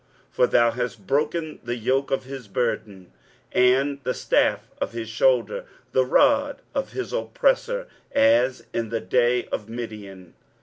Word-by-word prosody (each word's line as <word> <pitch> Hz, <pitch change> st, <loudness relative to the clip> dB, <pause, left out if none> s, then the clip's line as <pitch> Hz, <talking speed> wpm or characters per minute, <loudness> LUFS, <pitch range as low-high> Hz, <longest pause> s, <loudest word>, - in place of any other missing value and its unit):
23:009:004 -, -, -34 dB
For 125 Hz, -, +5 dB
thou 120 Hz, 0 st, +4 dB
hast 120 Hz, -4 st, -4 dB
broken 155 Hz, -, -1 dB
the 120 Hz, 0 st, -3 dB
yoke 130 Hz, +4 st, 0 dB
of 135 Hz, -, 0 dB
his 130 Hz, -3 st, -8 dB
burden, 100 Hz, -4 st, -3 dB, 0.4 s
and 135 Hz, +3 st, +3 dB
the 130 Hz, -, -2 dB
staff -, -, +1 dB
of -, -, -3 dB
his 115 Hz, -1 st, -4 dB
shoulder, 120 Hz, 0 st, +1 dB, 0.3 s
the 130 Hz, 0 st, +3 dB
rod 285 Hz, -, +3 dB
of 275 Hz, -1 st, -3 dB
his 385 Hz, -, -4 dB
oppressor, -, -, 0 dB, 0.3 s
as 280 Hz, -, +3 dB
in 115 Hz, -1 st, -2 dB
the 115 Hz, 0 st, -1 dB
day 120 Hz, +5 st, +2 dB
of 105 Hz, +1 st, -4 dB
Midian. 105 Hz, -6 st, -8 dB
125 Hz, 150 wpm, -24 LUFS, 115-150 Hz, 0.4 s, For